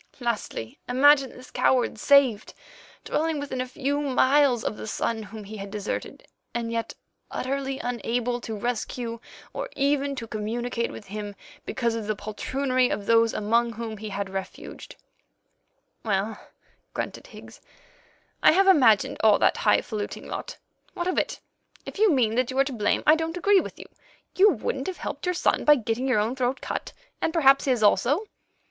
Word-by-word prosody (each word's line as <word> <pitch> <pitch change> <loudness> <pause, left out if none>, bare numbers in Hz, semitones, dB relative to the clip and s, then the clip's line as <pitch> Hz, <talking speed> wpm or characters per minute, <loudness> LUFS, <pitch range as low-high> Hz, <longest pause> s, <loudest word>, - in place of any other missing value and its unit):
Lastly, 230 - -4
imagine 275 +1 +5
this 255 0 -14
coward 245 -3 +1
saved, 270 -7 +3 0.5
dwelling 315 -1 0
within 270 -3 -3
a 255 - -3
few 285 +2 -2
miles 270 -2 +3
of - - -2
the - - -8
son 220 +1 -2
whom 215 +1 -9
he 215 +2 -9
had 200 0 -7
deserted, 205 0 -5 0.3
and 230 -1 -2
yet 230 0 -3 0.3
utterly 270 +1 -3
unable 245 0 -2
to 225 - -5
rescue 235 +1 -3 0.3
or - - -4
even 280 0 +1
to 245 -3 -5
communicate 230 +2 -3
with 210 - -10
him 205 0 -6 0.3
because 235 -3 -1
of 225 -2 -4
the 215 - 0
poltroonery 255 +5 -1
of 200 - -3
those 230 0 +4
among 230 +3 +1
whom 225 -1 -6
he 215 +1 -6
had 200 0 -3
refuged." 190 -1 -7 1.1
"Well," 210 0 -2 0.5
grunted - - -5
Higgs, - - -13 0.8
"I - - +6
have 390 +3 +4
imagined 255 - +5
all 215 -2 +6
that - - +2
high - - +3
faluting 210 -3 -5
lot. - - -6 0.4
What 345 - -2
of 370 - +1
it? - - -3 0.5
If - - -8
you 430 -3 +5
mean 240 -7 +2
that 250 +1 +1
you 260 - -4
are 275 - +6
to 275 -1 -5
blame, 210 -3 0
I 305 - +7
don't 325 +2 -1
agree 400 +2 +4
with - - -6
you. - - -10 0.5
You 405 +3 +7
wouldn't 265 - -2
have 375 - -4
helped - - -5
your 360 - +1
son - - +1
by 295 - +7
getting 240 +1 -2
your 255 - +2
own 220 +4 0
throat 255 0 -1
cut, - - -5 0.3
and - - +1
perhaps 275 -5 +4
his 250 -5 +1
also." 250 - +3
245 Hz, 175 wpm, -25 LUFS, 220-275 Hz, 1.1 s, I